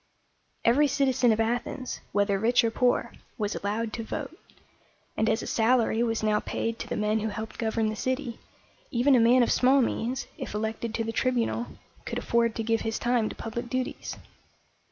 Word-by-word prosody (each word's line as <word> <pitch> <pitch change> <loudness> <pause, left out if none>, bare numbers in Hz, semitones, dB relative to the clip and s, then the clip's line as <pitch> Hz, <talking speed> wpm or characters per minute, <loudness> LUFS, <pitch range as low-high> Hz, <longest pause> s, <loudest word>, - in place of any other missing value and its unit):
Every 280 +6 +5
citizen 265 -3 +2
of 220 - +1
Athens, 240 +3 -2
whether 200 -1 +1
rich 235 +3 +3
or 230 - +1
poor, 245 +2 +1 0.2
was 210 -3 -1
allowed 215 +2 -2
to 230 - -3
vote; 280 +7 -5 0.8
and 220 - +1
as 220 - +1
a - - -5
salary 230 0 +2
was 225 -2 0
now 210 -1 +3
paid 230 +1 -3
to - - -5
the - - -3
men 210 +1 +1
who 220 - -2
helped 220 +1 -6
govern 220 -1 0
the 215 - -3
city, 255 +1 -2 0.5
even 255 +4 +3
a 250 - +6
man 240 +2 +5
of - - +1
small 260 +2 +4
means, 245 0 -1
if - - -5
elected 220 +1 -3
to 225 - 0
the 225 - -3
Tribunal, 240 0 0 0.4
could - - -4
afford 235 -1 +1
to 225 - -2
give 225 0 +1
his 225 0 -2
time 240 -3 +1
to - - -8
public 235 +1 -5
duties. 255 +1 -3
230 Hz, 190 wpm, -27 LUFS, 220-250 Hz, 0.8 s, a